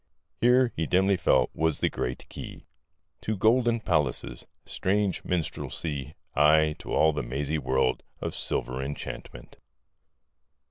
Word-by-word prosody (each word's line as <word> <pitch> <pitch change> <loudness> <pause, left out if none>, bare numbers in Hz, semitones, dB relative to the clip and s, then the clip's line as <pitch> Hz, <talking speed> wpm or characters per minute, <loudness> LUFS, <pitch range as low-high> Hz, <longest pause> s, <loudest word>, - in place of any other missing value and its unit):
Here, 125 0 +4
he 80 -1 -1
dimly 95 +2 +3
felt, 90 - +3
was 80 -1 +1
the - - +2
great 60 - -4
key - - -9 0.6
To 110 -1 -2
golden 115 +3 +3
palaces, 75 - -1 0.2
strange 100 0 0
minstrelsy,... 75 -4 -3 0.2
aye, 75 +1 +5
to - - -8
all 80 0 +4
the 75 - -2
mazy 70 +5 -2
world 65 -1 +1 0.2
Of - - -3
silvery 65 +1 -2
enchantment. 70 -3 -7
80 Hz, 125 wpm, -27 LUFS, 70-95 Hz, 0.6 s, aye